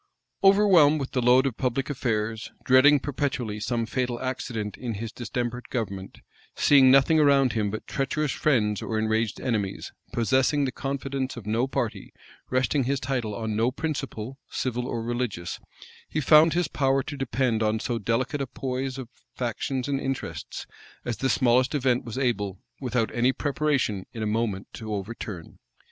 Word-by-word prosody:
Overwhelmed 190 -7 +6
with 135 - -4
the 125 - 0
load 125 +2 +5
of 130 -4 -2
public 130 +1 -1
affairs, 110 -5 -2
dreading 140 +3 +6
perpetually 135 -6 -2
some 115 +1 -1
fatal 125 0 -2
accident 120 -5 -3
in 120 -3 -4
his 110 +2 -5
distempered 120 +1 -4
government, 100 -6 -4 0.3
seeing 135 -3 +6
nothing 135 +4 +5
around 140 -3 +4
him 105 -2 0
but 110 +2 -5
treacherous 140 +1 -1
friends 105 -8 +1
or 110 - -2
enraged 110 0 0
enemies, 105 -6 -2 0.2
possessing 130 +4 +2
the 130 - -1
confidence 135 -1 -3
of 115 - -8
no 115 +4 +1
party, 135 - -3 0.4
resting 130 +1 +1
his 140 +1 0
title 125 -5 -2
on 110 0 -3
no 115 +3 +2
principle, 135 -4 -4
civil 125 -1 -2
or 115 -3 -3
religious, 115 -7 -3 0.5
he 155 - -1
found 155 +2 +6
his 175 -1 +1
power 135 -1 +1
to 145 - -6
depend 130 -4 0
on 110 0 +1
so 115 +1 -2
delicate 125 +7 -1
a 135 - -2
poise 130 +1 -3
of 130 -3 -6 0.3
factions 125 +2 -2
and 140 -1 -1
interests, 135 -1 -4 0.4
as 120 -2 -2
the 135 - 0
smallest 130 +2 +3
event 130 -3 +1
was 115 0 -7
able, 105 -7 -1 0.2
without 125 -4 -1
any 120 +2 +3
preparation, 140 -9 -1
in 110 - -4
a - - -1
moment 105 -2 -1
to 110 -1 -7
overturn. 100 -3 -6
125 Hz, 160 wpm, -26 LUFS, 110-135 Hz, 0.5 s, Overwhelmed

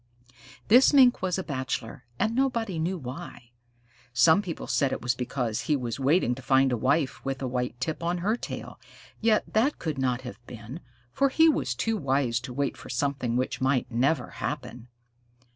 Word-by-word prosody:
This 250 +6 +6
Mink 255 -3 +6
was 185 -1 0
a 190 - -2
bachelor, 130 -3 -4
and 220 - 0
nobody 230 -9 0
knew 180 +4 -1
why. 130 -3 -9 0.6
Some 160 +10 +5
people 175 -6 -6
said 140 -2 +1
it - - -2
was 120 +1 +1
because 120 -2 -2
he 150 - +2
was 120 -2 -3
waiting 135 -1 +2
to 130 - -8
find 135 0 +3
a - - +2
wife 135 +4 0
with 135 -1 -3
a 130 - -3
white 125 -1 -3
tip 155 +5 -3
on 170 +1 -1
her 215 +2 +2
tail, - - -7 0.4
yet 220 -1 +1
that 245 +7 +2
could 155 -4 -4
not 130 -1 0
have 125 -1 -9
been, 120 +5 -8 0.3
for 275 - +2
he 320 +4 +5
was 130 - +1
too 220 - -1
wise 135 - 0
to 125 +1 -8
wait 140 +2 -2
for - - -11
something 130 -2 -1
which 130 +1 -2
might 130 -1 +1
never 125 +3 +1
happen. 125 -5 -5
135 Hz, 185 wpm, -27 LUFS, 125-175 Hz, 0.6 s, This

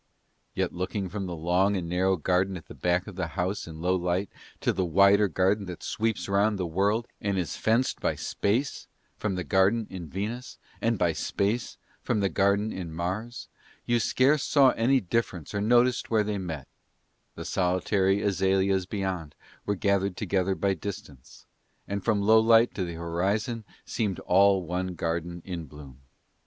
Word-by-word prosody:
Yet - - -1
looking 95 +2 -3
from 95 0 -4
the 85 - -4
long 90 +5 +2
and 85 -2 -4
narrow 95 +2 +1
garden 90 +3 +1
at 80 - -12
the - - -11
back 90 +1 0
of 100 -3 -10
that 85 -3 -3
house 95 +2 -1
in 80 -1 -9
Lowlight 90 +1 0 0.3
to - - +1
the 95 - 0
wider 100 +4 +5
garden 95 +3 +1
that 90 - -8
sweeps 110 0 -1
round 100 +2 +2
the 95 - -2
world, 100 +7 0
and 100 -1 -1
is 90 -4 -2
fenced 115 +4 +1
by - - 0
Space 120 +8 -1 0.3
from 105 -3 -1
the 90 - -2
garden 100 +5 +2
in 90 -3 -6
Venus 110 - -5 0.2
and 115 -1 +1
by 85 -3 +2
Space 105 +8 -2 0.2
from - - 0
the 100 -1 +1
garden 100 +2 +1
in 90 -3 -6
Mars, 95 +9 -4 0.4
you 120 0 +2
scarce 135 +7 +3
saw 135 -3 +5
any 130 +4 +2
difference 95 -5 -2
or 100 - -1
noticed 120 +3 +3
where 110 -2 +3
they 105 -1 -2
met: 80 -7 -5 0.7
the - - -7
solitary 95 +2 +1
azaleas 95 -1 +1
beyond 95 -7 -3 0.3
were 105 - +1
gathered 100 -1 0
together 95 0 0
by 100 0 +1
distance, 95 -8 -9 0.4
and 100 -1 -3
from 105 -1 +1
Lowlight 115 +2 +5
to 95 - -2
the 85 -2 -5
horizon 100 +7 -2 0.2
seemed 105 -5 -2
all 95 +1 +4
one 90 +1 -3
garden 85 +1 -3
in 85 -4 -5
bloom. 70 -3 -13
95 Hz, 170 wpm, -27 LUFS, 90-105 Hz, 0.7 s, wider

